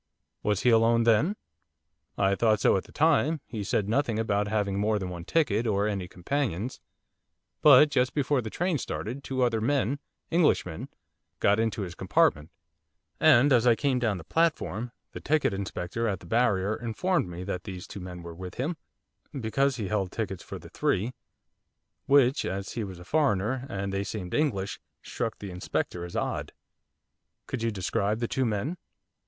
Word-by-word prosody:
'Was 105 -2 0
he 125 - +5
alone 115 +1 +4
then?' 115 - +3 0.8
'I 95 0 +3
thought 110 0 +3
so - - +4
at 95 - -1
the - - -16
time, 155 0 +3
he 110 -4 -5
said 100 +1 0
nothing 115 0 +1
about 105 -2 0
having 100 -2 0
more 105 +1 +2
than 95 -2 -4
one 85 -1 -6
ticket, 120 - +1
or 100 -1 +1
any 100 -4 -2
companions, 115 - -2 0.8
but 150 0 +8
just 130 -1 +1
before 145 -2 +1
the 110 - -5
train 175 - -1
started 125 +6 -5
two 130 -1 -1
other 115 -3 +1
men 140 +2 +1 0.3
English 165 -1 +3
men 80 -3 -7 0.5
got 100 +2 +3
into 110 -2 0
his 90 -2 -6
compartment; 75 -2 +2 0.7
and 135 +4 +6
as 125 0 +4
I 120 - +6
came 135 0 +1
down 110 -5 0
the 85 - -9
platform, 120 - 0 0.2
the - - -7
ticket 155 -6 +1
inspector 95 +3 -3
at 100 -4 -1
the - - -14
barrier 110 -1 +2
informed 120 - -1
me 90 +1 -6
that 90 -2 -4
these 90 -2 -7
two - - -8
men 90 -1 -8
were 85 0 -8
with 90 +2 -8
him, 155 +6 -2 0.6
because 135 +4 +1
he 110 -5 -3
held 95 -2 -1
tickets 100 -5 -4
for - - -7
the - - -12
three, 110 +7 0 0.9
which, 140 0 +4
as 95 +1 -3
he 115 - -3
was 95 -3 -7
a 90 - -12
foreigner, 130 - +1
and 100 -3 -3
they 100 0 0
seemed 95 -3 -5
English, 100 -11 0 0.2
struck 115 -2 -3
the 100 -2 -7
inspector 90 -1 -3
as 85 - -7
odd.' - - -2 0.9
'Could 130 - -4
you 115 - +1
describe 100 +1 -1
the 120 - -1
two 130 0 0
men? 120 - -2
110 Hz, 180 wpm, -28 LUFS, 95-130 Hz, 0.9 s, but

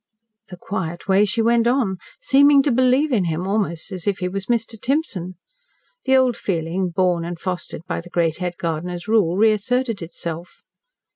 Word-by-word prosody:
The 180 - -10
quiet 175 -2 -5
way 195 +2 +4
she 225 +3 0
went 235 0 +3
on! 240 -7 +1 0.2
Seeming 285 - +5
to 285 - +1
believe 260 +4 +3
in 210 -7 +2
him, 165 +2 -2
almost 195 -3 -2
as 185 -2 -6
if 200 -1 +1
he 180 - -2
was 190 +1 -5
Mr. 230 -2 -1
Timson. 210 - -2 0.7
The 265 0 +4
old 255 -2 +3
feeling, 175 0 -2
born 175 -1 +1
and 170 0 -5
fostered 180 -3 -5
by 170 - -3
the 175 - -13
great 165 -3 0
head 180 -1 -4
gardener's 175 +2 -4
rule, 200 -6 +2
reasserted 225 +2 +1
itself. 170 0 -7
190 Hz, 170 wpm, -21 LUFS, 175-235 Hz, 0.7 s, Seeming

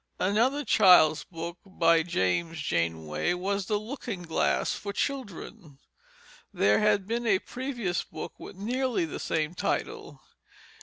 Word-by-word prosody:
Another 240 +9 +1
child's 180 -6 +6
book, 170 0 -7
by 165 -4 +3
James 160 - -1
Janeway, 85 - -1
was 195 +2 -2
The 210 - +1
Looking 220 -4 -6
Glass 160 -2 0
for 200 - -5
Children. 205 - -5 0.7
There - - +3
had 210 -2 +2
been 235 +3 -2
a 200 -3 +4
previous 240 -5 -3
book - - -8
with - - -10
nearly 240 0 -1
the 160 - -6
same 155 0 -1
title. - - -3
185 Hz, 130 wpm, -28 LUFS, 165-220 Hz, 0.7 s, child's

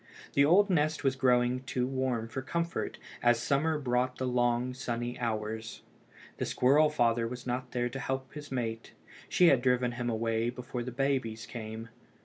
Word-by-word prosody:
The 140 - +5
old 195 +7 +5
nest 155 -2 +1
was 135 -1 +2
growing 125 -1 +3
too 130 -1 -2
warm 130 -3 -1
for 130 +3 -4
comfort, 170 +5 -2 0.2
as 120 -1 +4
summer 150 +5 +1
brought 125 -2 0
the 130 - -2
long 125 0 +1
sunny 120 -1 -4
hours. 110 -1 -3 0.5
The - - -1
squirrel 145 +5 +4
father 115 -5 +2
was 125 +1 -7
not 125 0 -3
there 120 -1 -1
to 130 +3 -6
help 130 0 -3
his 150 -1 -9
mate. 115 -3 -3 0.4
She 180 -2 +5
had 135 -3 +4
driven 125 -1 +2
him 120 0 -3
away 115 0 0
before 125 0 -5
the 125 +1 -5
babies 125 -4 -1
came. 110 -1 -7
125 Hz, 170 wpm, -30 LUFS, 120-135 Hz, 0.5 s, The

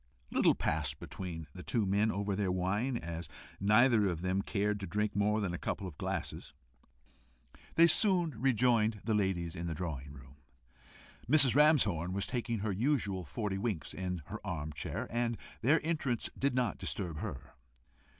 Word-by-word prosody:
Little - - +4
passed 75 -2 -1
between 85 0 -6
the 90 - -8
two 110 +2 0
men 100 +3 +2
over 100 0 -1
their 95 -2 0
wine; 100 +8 0
and - - -8
as 85 -1 -5 0.3
neither 110 +1 +5
of 85 -2 -3
them 95 +1 +1
cared 105 0 -1
to 95 - -5
drink 105 +4 -1
more 105 +1 +2
than 95 -4 -1
a 90 - -4
couple 100 - -3
of 85 -6 -8
glasses, - - -4 1.2
they 165 - +8
soon 175 -1 +3
rejoined 115 -3 +2
the 110 - 0
ladies 95 -5 0
in 85 +1 -4
the 80 - -3
drawing 75 -5 -5
room. 70 0 -14 0.9
Mrs. 140 -4 +7
Ramshorn 110 - +4
was 100 0 -1
taking 115 -4 -2
her 105 0 -1
usual 100 -4 0
forty 95 +6 -3
winks 100 -7 -3
in 90 -3 -4
her - - -6
arm 75 -2 -4
chair, 65 - -4
and 120 -1 0 0.2
their 145 +7 +4
entrance 145 -8 -1
did 140 -1 0
not 125 -4 0
disturb 90 -4 -3
her. - - -6
100 Hz, 170 wpm, -33 LUFS, 90-120 Hz, 1.2 s, they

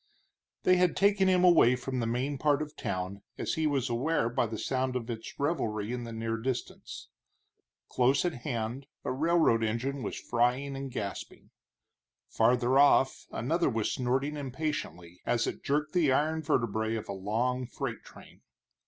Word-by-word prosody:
They 185 0 +5
had 180 -1 +2
taken 200 0 +4
him 185 -1 +4
away 165 -9 +6
from 130 0 -4
the 115 - -1
main 130 +4 -2
part 150 -1 +2
of 150 0 -10
town, 95 +2 -4 0.2
as - - -2
he 160 -1 +1
was 140 -4 0
aware 120 +1 0
by 120 0 0
the 110 0 -5
sound 130 +2 -1
of 120 -1 -3
its 115 -1 -8
revelry 115 -8 -1
in 120 -1 -4
the 115 - -7
near 115 0 -2
distance. 125 +1 -5 0.8
Close 130 +5 +2
at 175 - 0
hand 120 0 -3 0.2
a - - -1
railroad 155 -4 +3
engine 125 +5 -2
was - - -4
frying 125 +4 0
and 135 0 -5
gasping; 100 -5 -6 0.8
farther 125 +3 +3
off 140 -2 +4
another 165 +8 0
was 115 -4 -1
snorting 135 +4 -1
impatiently 130 - -4
as 120 -2 +1
it - - -5
jerked 150 +2 0
the 165 -6 +3
iron 155 +4 +1
vertebrae 110 -5 0
of 110 - -5
a - - -4
long 120 +6 -1
freight - - -5
train. - - -15
125 Hz, 165 wpm, -30 LUFS, 115-145 Hz, 0.8 s, away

